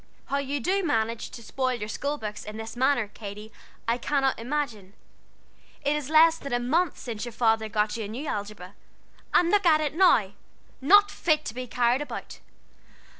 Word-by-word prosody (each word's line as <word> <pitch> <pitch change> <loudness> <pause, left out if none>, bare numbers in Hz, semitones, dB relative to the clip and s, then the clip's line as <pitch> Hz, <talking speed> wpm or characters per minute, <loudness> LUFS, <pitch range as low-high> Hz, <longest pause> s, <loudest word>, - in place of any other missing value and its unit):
How 280 - +1
you 280 +1 -2
do 385 +9 0
manage 230 -7 -1
to 235 - -11
spoil 255 +3 -1
your 210 -3 -5
school 285 +7 -3
books 210 -4 -6
in 210 +1 -8
this 225 +1 -7
manner, 260 -2 +2
Katy, 210 +1 -9 0.4
I 235 +2 +1
cannot 270 -1 0
imagine. 230 -7 -3 0.9
It 290 +1 +2
is 295 -2 -4
less 320 +1 +6
than 280 - -7
a 245 - +2
month 310 +7 +1
since 225 -4 -6
your 240 - -5
father 225 -2 +2
got 210 0 0
you 220 - -4
a - - -5
new 240 +8 -6
algebra, 205 -6 -5 0.6
and 345 0 +4
look 410 -3 +3
at 310 -2 +6
it 300 -2 -1
now 310 - +4 0.5
not 405 +9 +6
fit 305 -2 +1
to - - -4
be 250 +1 -6
carried 245 +2 +1
about. 295 - -7
250 Hz, 185 wpm, -26 LUFS, 220-295 Hz, 0.9 s, less